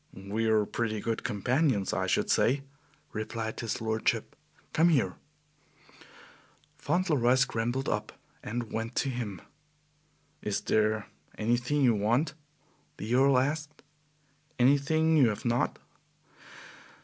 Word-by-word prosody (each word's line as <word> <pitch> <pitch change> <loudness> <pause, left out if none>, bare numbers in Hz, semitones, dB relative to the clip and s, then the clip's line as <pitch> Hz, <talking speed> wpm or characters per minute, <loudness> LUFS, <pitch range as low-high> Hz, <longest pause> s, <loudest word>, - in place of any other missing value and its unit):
"We 100 +4 -2
are 110 -1 +3
pretty 110 0 -2
good 115 +2 -2
companions, 120 - +1
I - - 0
should - - +1
say," 135 +3 +2 0.5
replied 110 +1 -4
his 115 -2 -3
lordship. 110 0 -1 0.4
"Come 165 +2 +4
here." 125 - +2 1.7
Fauntleroy 150 -9 +2
scrambled 130 0 0
up - - -2 0.3
and 115 +1 -5
went 115 +2 -3
to 135 - +1
him. 115 -7 -4 1.0
"Is 105 -1 -2
there 110 0 +1 0.3
anything 120 +6 +1
you 120 -3 +5
want," 120 +9 +1 0.6
the 110 +4 -3
Earl 135 +1 +5
asked; 150 +3 -2 0.7
"anything 145 +5 +3
you 130 -6 +6
have 105 - -5
not?" 120 +1 +1
120 Hz, 115 wpm, -29 LUFS, 110-135 Hz, 1.7 s, you